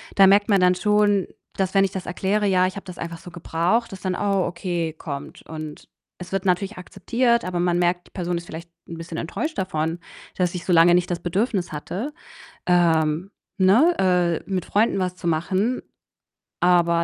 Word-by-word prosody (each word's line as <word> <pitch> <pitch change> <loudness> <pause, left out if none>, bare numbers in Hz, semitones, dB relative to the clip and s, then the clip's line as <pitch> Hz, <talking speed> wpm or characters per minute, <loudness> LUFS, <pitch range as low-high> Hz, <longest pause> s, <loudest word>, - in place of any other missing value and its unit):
da 195 - +7
merkt 205 +3 +4
man 200 -2 +4
dann 180 0 +5
schon, 205 0 +2 0.3
dass 190 -1 0
wenn 195 - +6
ich 195 - 0
das 190 - -5
erkläre: 200 +3 0
„Ja, 185 -1 +3
ich 185 - -3
habe 195 - -8
das 180 -2 -9
einfach 170 0 -6
so 180 - -11
gebraucht“, 180 +7 0
dass 190 - -9
dann: 185 -1 -1
„Oh 200 -2 +1
okay“ 175 -2 -3
kommt 140 -3 -7
und 155 -1 -8 0.3
es 180 0 -10
wird 195 0 -2
natürlich 190 +2 0
akzeptiert, 235 +6 0
aber 180 -1 -2
man 175 0 +1
merkt, 175 0 0
die - - -24
Person 175 -1 -2
ist 170 - -7
vielleicht 165 +2 -8 0.2
'n 165 - -7
bisschen 165 0 -7
enttäuscht 310 - -4
davon, 165 -2 -2 0.4
dass 180 -1 0
ich 180 - -5
so 180 - +1
lange 170 +1 +6
nicht 180 0 +1
das 175 - -1
Bedürfnis 190 +2 -1
hatte, 195 - -5 0.5
ähm, 165 0 +2 0.3
ne, 230 - +5 0.5
äh, - - -14
mit 185 -2 -1
Freunden 210 -1 +1
was 180 -1 -1
zu 175 -1 -6
machen. 190 +9 0 0.8
Aber 170 -1 +3
180 Hz, 195 wpm, -23 LUFS, 170-195 Hz, 0.8 s, da